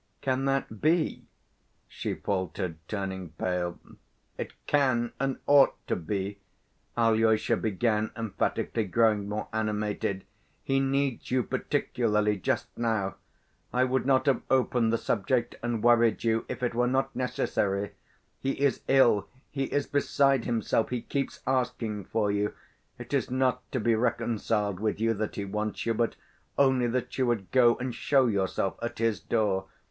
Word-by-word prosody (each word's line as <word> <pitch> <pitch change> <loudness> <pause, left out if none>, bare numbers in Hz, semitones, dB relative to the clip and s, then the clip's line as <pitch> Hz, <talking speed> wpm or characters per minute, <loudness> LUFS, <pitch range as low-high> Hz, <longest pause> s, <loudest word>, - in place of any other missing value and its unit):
Can 130 0 0
that 135 -6 -1
be?" 160 +1 +1 0.6
she - - -4
faltered, 95 -3 -3
turning 95 -5 -4
pale. 90 -1 -1 0.6
"It - - -5
can 130 -5 +2
and 135 -1 0
ought 145 -1 +6
to - - 0
be!" 100 +3 -3 0.6
Alyosha 110 -1 +3
began 110 +1 0
emphatically, 115 0 -1
growing 105 0 +2
more 105 +1 -3
animated. 105 -3 -1 0.4
"He 135 0 +1
needs 135 -1 0
you 125 0 +2
particularly 105 -2 0
just 95 - -2
now. 110 -5 -1 0.5
I 125 - +2
would 130 +1 0
not 135 0 +3
have 140 -2 +2
opened 125 -3 +2
the 115 - +2
subject 120 +3 0
and 120 -2 -2
worried 120 -1 +4
you, 115 -1 +1
if 125 - -5
it 120 - 0
were 120 +1 +2
not 135 +1 0
necessary. 100 -5 -1 0.5
He 135 0 -1
is 140 -1 +2
ill, 125 -6 +4 0.2
he 135 -2 -1
is 145 +1 -1
beside 140 -2 +2
himself, 115 -1 0
he 125 -2 -3
keeps 140 -1 -3
asking 120 -6 -1
for 105 -2 0
you. 105 +1 -1 0.4
It - - -9
is - - +1
not 125 -1 0
to 130 - -1
be 115 +1 +2
reconciled 110 -3 0
with 110 0 -1
you 115 0 +2
that 110 0 -3
he 100 - -3
wants 105 +2 -3
you, 115 - +2
but 115 +1 0 0.4
only 130 -3 +4
that 125 +2 -2
you 130 - +3
would 110 -6 -1
go 120 -2 +5
and 125 0 -4
show 135 +3 +3
yourself 100 -3 0
at 120 +1 -4
his 115 -3 +1
door. 100 -4 0
115 Hz, 155 wpm, -28 LUFS, 105-130 Hz, 0.6 s, ought